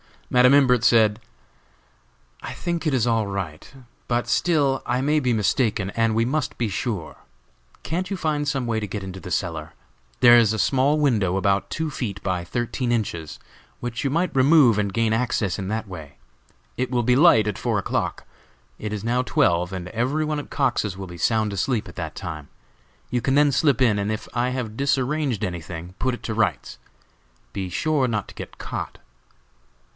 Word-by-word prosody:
Madam 125 +1 +6
Imbert 125 -4 +4
said: 110 -2 +4 1.2
"I - - -6
think 170 -2 -3
it 150 - +1
is 125 -3 +2
all 115 -3 +1
right, 95 -6 -5 0.4
but 120 0 0
still 145 -6 +2
I 125 +2 0
may 150 +3 +2
be 125 -4 +1
mistaken, 105 -1 +1
and 115 0 +1
we 115 - +3
must 145 +3 -2
be 115 -3 -1
sure. 100 -4 -4 0.7
Can't 180 +4 -2
you 200 - -2
find 150 -3 -1
some 135 -3 -1
way 115 -2 0
to 105 - -4
get 100 0 -5
into 95 0 -7
the 90 - -9
cellar? 80 -4 -3 0.5
There 120 -1 +8
is 110 -2 +4
a - - -2
small 135 +6 +2
window, 110 -11 +2
about 95 0 +1
two 160 -1 -3
feet 100 -8 -5
by 90 -3 -1
thirteen 120 +5 -2
inches, 85 -9 -2 0.4
which 120 -1 -4
you 140 - +1
might 170 +2 0
remove, 130 -5 +5
and 100 -1 0
gain 115 0 +1
access 110 -5 0
in 95 - -4
that 110 +2 -3
way. 80 -7 -10 0.6
It 130 0 -1
will 125 -1 0
be 125 +2 +3
light 145 - +6
at 105 -2 -2
four - - 0
o'clock; - - -2 0.5
it 105 0 -4
is 105 -1 -4
now 120 +2 +1
twelve, 90 -7 +1
and 90 -1 -5
every 130 +9 0
one 150 -1 -1
at 145 - -8
Cox's 120 -8 0
will 95 -1 -6
be 85 -1 -9
sound 110 +3 +1
asleep 105 +4 -1
at - - -14
that 80 -3 -5
time. 80 -6 -6 0.6
You 125 - 0
can 135 +3 +1
then 145 0 +5
slip 140 -1 +2
in, 110 -5 +3
and 100 +1 -1
if 110 - -4
I 125 +1 +1
have 120 -4 -4
disarranged 135 -3 0
anything, 85 -1 -5
put 130 +3 0
it 120 - -8
to 110 - -3
rights. 115 0 -1 0.7
Be 95 -2 -4
sure 140 - +1
not 105 -4 -2
to - - -11
get - - -9
caught!" - - -5
115 Hz, 190 wpm, -23 LUFS, 100-135 Hz, 1.2 s, There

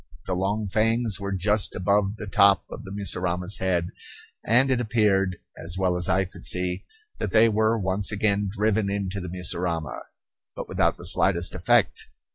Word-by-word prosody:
The 95 - -3
long 100 +3 -2
fangs 110 +1 0
were 100 0 -5
just 100 +2 +2
above 100 +2 0
the 105 - -8
top 100 0 +4
of - - -8
the 95 - -9
mussurama's 90 -1 -1
head; 90 -2 -1 0.5
and 125 +4 +3
it 125 -1 +1
appeared, 100 -5 +1 0.2
as 85 +3 -6
well 95 -2 0
as 90 +1 -1
I 95 +1 +2
could 90 - -14
see, 90 0 +1 0.3
that - - -2
they 115 +1 +5
were 110 +1 +1
once 95 +1 -1
again 100 -1 0
driven 105 0 0
into 100 -1 -3
the 90 - -6
mussurama; 85 -5 -4 0.6
but - - -7
without - - 0
the 85 - -11
slightest 90 -1 +2
effect. 90 -1 +1
95 Hz, 170 wpm, -24 LUFS, 90-105 Hz, 0.6 s, they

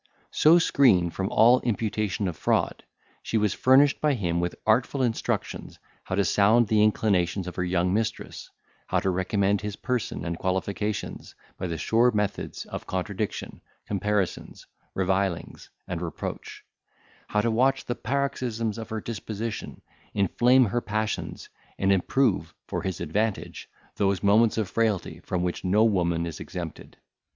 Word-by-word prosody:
So 160 +3 +6
screened 115 - +4
from 95 0 -2
all 120 +3 +5
imputation 105 -3 -1
of 90 - -3
fraud, - - 0 0.4
she 115 - -1
was 105 -2 +2
furnished 135 +2 +4
by 150 -2 +2
him 85 -6 -1
with 85 0 -2
artful 125 +5 +2
instructions 115 -3 -2 0.3
how 95 - -2
to 100 0 +2
sound 105 +6 +4
the 110 -1 +4
inclinations 100 -4 +2
of 90 -1 -7
her 90 - -1
young 90 0 +1
mistress, 110 +1 -3 0.4
how - - +1
to 95 - +1
recommend 95 +2 +1
his 105 -1 -4
person 125 -7 -3
and 85 -1 -3
qualifications 100 +3 -3 0.2
by 95 - -4
the 85 -1 -3
sure 115 +9 +3
methods 105 -3 -2
of - - -7
contradiction, 95 +3 -4 0.2
comparisons, 100 -1 -2 0.3
revilings, 95 -2 -1 0.2
and - - -4
reproach; - - -6 0.6
how 105 - +1
to 115 +1 0
watch 130 +4 +2
the 120 - -1
paroxysms 120 -5 -2
of 115 - -7
her 110 -1 -3
disposition, 110 0 -5 0.3
inflame 120 +6 +4
her 120 +3 -1
passions, 110 0 -3 0.3
and 95 0 +2
improve, 95 -3 +1
for - - -3
his 95 -3 -4
advantage, 105 +6 -2 0.3
those 100 -1 +1
moments 110 +3 +4
of 110 -3 0
frailty 110 -2 -1
from 90 -1 -3
which 90 -1 -3
no 100 +4 +3
woman 85 -6 +1
is 85 -2 -6
exempted. 85 -4 -7
105 Hz, 145 wpm, -26 LUFS, 95-115 Hz, 0.6 s, So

